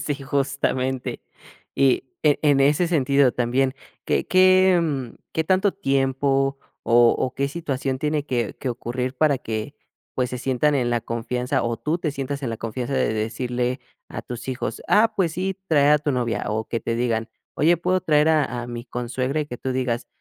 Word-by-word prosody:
Sí, 145 - -1
justamente. 135 -2 -1 0.5
Y 135 -2 +3 0.2
en 150 -2 +4
en 145 -2 +4
ese 145 +5 +3
sentido 140 -5 +3
también 130 +2 0 0.3
¿qué - - 0
qué, 185 0 +5
mm, 135 -7 -2 0.2
qué 160 - 0
tanto 190 +3 +2
tiempo, 135 -4 +1 0.2
o 120 0 +5
o 130 - -1
qué 140 +1 -1
situación 140 -4 -3
tiene 150 +1 -1
que 120 -4 -1
que 130 - -3
ocurrir 125 +2 -3
para 145 0 +2
que, 110 +4 -5 0.4
pues, 125 -1 -1
se 125 - -4
sientan 135 +4 +1
en 120 -3 +1
la 120 - +1
confianza, 125 +2 -2
o 115 0 -1
tú 155 +8 -1
te 165 -3 -2
sientas 140 0 -4
en 125 - -2
la 115 - -3
confianza 120 +4 -4
de 110 - +1
decirle 120 +3 -2 0.3
a - - -6
tus 120 +1 -8
hijos: 130 -1 -4
"Ah 225 +2 +4
pues 175 -5 +1
sí, 190 +3 -2
trae 145 -3 +4
a 150 - +6
tu 145 -1 -1
novia"?, 120 -3 -1
o 110 +1 -2
que 115 - -2
te 115 - -2
digan: 115 -1 -1 0.3
"¿Oye 165 +4 +3
puedo 185 +2 0
traer 150 -2 +3
a 145 -6 +1
a - - -6
mi 120 0 -6
consuegra?", 125 +4 -2
y 150 - -3
que 125 - -7
tú 130 - -3
digas: 125 -2 -1
135 Hz, 190 wpm, -23 LUFS, 120-150 Hz, 0.5 s, a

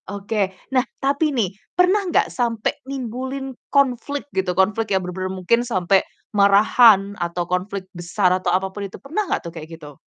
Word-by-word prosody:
Oke. 200 0 -1 0.2
Nah 255 - +5 0.2
tapi 280 +3 +1
nih, 225 -10 -1 0.2
pernah 365 +3 +4
gak - - +1
sampe 230 -3 0 0.2
nimbulin 260 +1 -4 0.2
konflik 280 0 +1
gitu, 185 -1 -1
konflik 210 +4 +2
yang 190 -2 +1
bener-bener 185 +1 -4
mungkin 190 +6 +1
sampe 195 -5 +2 0.3
marahan 200 0 +5
atau 175 0 -1
konflik 185 +2 -3
besar 180 +2 0
atau 185 -1 -1
apapun 190 +2 -1
itu 190 - -11
pernah 340 +8 -3
gak - - -1
tuh 170 - -5
kayak 160 -2 -8
gitu? 150 -2 -11
200 Hz, 160 wpm, -21 LUFS, 185-255 Hz, 0.3 s, Nah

